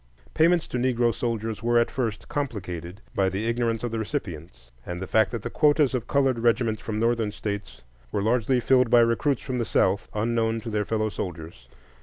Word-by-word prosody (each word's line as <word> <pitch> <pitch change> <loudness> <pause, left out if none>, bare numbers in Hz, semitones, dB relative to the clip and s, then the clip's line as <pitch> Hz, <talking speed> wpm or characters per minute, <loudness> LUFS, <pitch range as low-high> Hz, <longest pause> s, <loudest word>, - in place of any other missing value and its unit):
Payments 170 +1 +3
to 125 - -2
Negro 120 -2 +2
soldiers 110 -2 -3
were 120 +1 +2
at 120 - +2
first 115 -5 -3
complicated 95 - -4
by 95 -1 +2
the 95 +4 -3
ignorance 115 -1 0
of 120 - -2
the 115 - -2
recipients, 85 - -6
and 90 0 -5
the 95 - -4
fact 110 +2 +3
that 115 -4 -5
the - - -4
quotas 150 -2 +3
of 125 -3 -2
colored 135 -4 +2
regiments 115 -1 +1
from 110 -1 -4
Northern 115 -2 +1
States 100 - -6 0.3
were 100 - -1
largely 125 +3 +2
filled 125 0 +3
by 120 0 +6
recruits 115 +4 +1
from 125 -1 -3
the - - +1
South, 100 -2 +1
unknown 115 +1 0
to 115 0 -6
their 105 -1 0
fellow 110 -1 0
soldiers. 80 - -7
115 Hz, 195 wpm, -25 LUFS, 100-120 Hz, 0.3 s, by